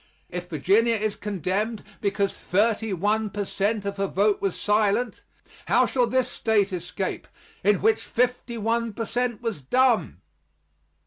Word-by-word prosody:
If 180 0 -6
Virginia 200 +9 +3
is 215 -1 -1
condemned 205 +2 -2 0.2
because 200 -1 0
thirty 220 +3 +1
one 210 +4 +1
per 205 +1 -3
cent 205 +2 -1
of 200 0 -3
her 195 0 0
vote 200 +2 +1
was 195 -3 -1
silent, 210 +3 +1 0.5
how - - +4
shall 250 -2 +1
this 255 +2 +1
State 205 -3 +1
escape, 180 +2 -4 0.4
in 205 +1 +3
which 440 0 +3
fifty 245 -1 -1
one 230 +1 0
per 230 +2 -3
cent 240 0 -2
was 225 -10 -3
dumb? 250 - +2
210 Hz, 145 wpm, -25 LUFS, 195-230 Hz, 0.5 s, how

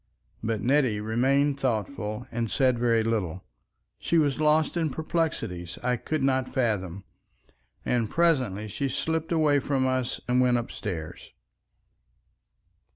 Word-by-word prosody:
But 110 -2 -1
Nettie 130 -5 +2
remained 135 +6 +1
thoughtful 115 -2 -2
and 115 -1 -2
said 130 -1 +2
very 115 -2 +3
little. 95 -6 -2 0.6
She 170 - +1
was 145 -3 +2
lost 155 +1 +3
in 165 -2 +1
perplexities 150 - -2
I 125 0 +2
could 155 +5 -2
not 130 -1 +1
fathom, 100 - -1 0.8
and 115 -3 +1
presently 130 - +1
she 135 +7 -2
slipped 160 +5 -2
away 155 -3 +3
from 135 -1 0
us 130 -1 -1
and 125 +1 +3
went 125 -1 +3
upstairs. 90 -8 -5
125 Hz, 125 wpm, -27 LUFS, 110-145 Hz, 0.8 s, very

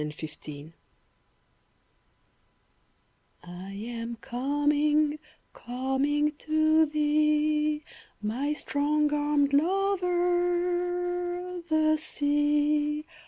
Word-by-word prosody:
SWIMMING 150 0 -4
SONG 155 0 -9 2.7
I 180 +2 -9
am 230 +3 -5
coming, 290 +4 +1 0.3
coming 270 +4 0
to 315 0 +3
thee, 300 0 +1 0.4
My 250 +8 -1
strong 300 0 0
armed 290 -1 +1
lover, 355 0 0
the 310 0 +3
Sea! 295 0 +1
300 Hz, 65 wpm, -28 LUFS, 280-315 Hz, 2.7 s, to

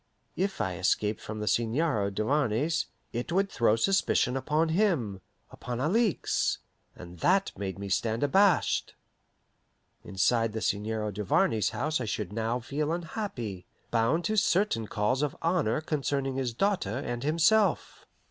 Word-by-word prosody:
If 195 +2 -1
I 95 -5 -2
escaped 105 +3 +1
from 110 0 -6
the 105 - -3
Seigneur 115 - +1
Duvarney's, 135 +8 0 0.3
it 120 +8 -3
would 195 +3 +1
throw 115 -2 +3
suspicion 130 -3 +2
upon 150 +5 +1
him, 160 - +1 0.3
upon 125 -1 -5
Alixe, 195 - +1 0.4
and 90 -1 -11
that 195 +2 +2
made 95 -2 -4
me 100 0 -6
stand 110 +5 0
abashed. 190 +6 +2 1.1
Inside 115 +3 +1
the 110 - -3
Seigneur 105 +1 -1
Duvarney's 105 +2 +1
house 155 -3 -1
I - - -2
should 105 -2 -3
now 115 +2 -1
feel 145 +5 -2
unhappy, 160 - -4 0.2
bound 120 +9 +1
to 215 0 0
certain 190 - +2
calls 110 +6 0
of 150 -1 -2
honour 165 -7 +1
concerning 140 -3 -1
his 130 -2 -1
daughter 130 - 0
and 120 -3 -4
himself. 170 +8 +2
125 Hz, 140 wpm, -28 LUFS, 110-165 Hz, 1.1 s, throw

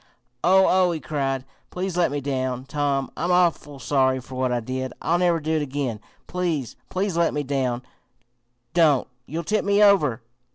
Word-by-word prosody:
"Oh! 190 +3 +6
oh!" 185 -1 +4
he 160 - -3
cried. 135 -2 -2 0.2
"Please 185 0 -3
let 175 -1 +3
me 145 +1 -3
down, 130 -2 -2
Tom. 140 -1 -1
I'm 175 +3 -1
awful 170 -5 +2
sorry 130 -1 +1
for 130 +1 -12
what 130 0 0
I 120 - +1
did! 130 +2 -4
I'll 170 +1 +1
never 175 -2 +3
do 155 +1 -3
it - - 0
again! 135 -5 -3 0.3
Please, 170 -9 -2
please 190 -1 -1
let 170 -2 +2
me 150 - -1
down! 130 -3 -1 0.9
Don't! 155 -6 +4 0.2
You'll 165 +4 -4
tip 215 +6 0
me 200 +1 +4
over!" 150 - +4
145 Hz, 175 wpm, -24 LUFS, 130-175 Hz, 0.9 s, Oh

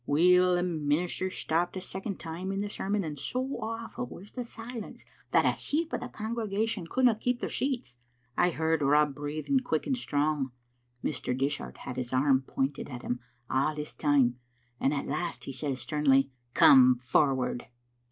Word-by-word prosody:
Weel, 180 +4 +5
the 175 - +1
minis 160 0 0
ter 185 - 0
stopped 175 0 -1
a - - -1
second 190 +1 -5
time 175 +3 -4
in 195 0 -1
the 205 0 -3
sermon, 200 0 -1
and 150 -3 -5
so 255 - -2
awful 230 +2 -4
was 195 +4 -11
the 250 - -4
silence 230 -1 -8 0.2
that - - +4
a - - +5
heap 325 +2 -2
o* - - +2
the - - -5
congregation 220 -3 -2
couldna 250 +4 +4
keep 245 +3 -1
their - - -3
seats. 250 - -2 0.4
I 175 - +4
heard 160 -2 0
Rob 150 +1 +4
breathing 150 - -1
quick 160 -12 -1
and 275 - +1
strong. 145 - 0 0.5
Mr. 125 -3 -2
Dishart 130 - -2
had 125 - -7
his 125 -1 -3
arm 130 0 +4
pointed 135 +2 -2
at 125 -3 -7
him 125 - -2 0.3
a' 135 +4 +1
this 150 0 -5
time, 135 -5 +2 0.4
and 135 - +2
at 145 -2 -1
last 165 +4 -3
he 135 - -6
says 135 -2 -2
sternly, 135 -3 +2 0.2
'Come 130 -2 +8
forward.' 130 0 +1
160 Hz, 175 wpm, -29 LUFS, 140-205 Hz, 0.5 s, Come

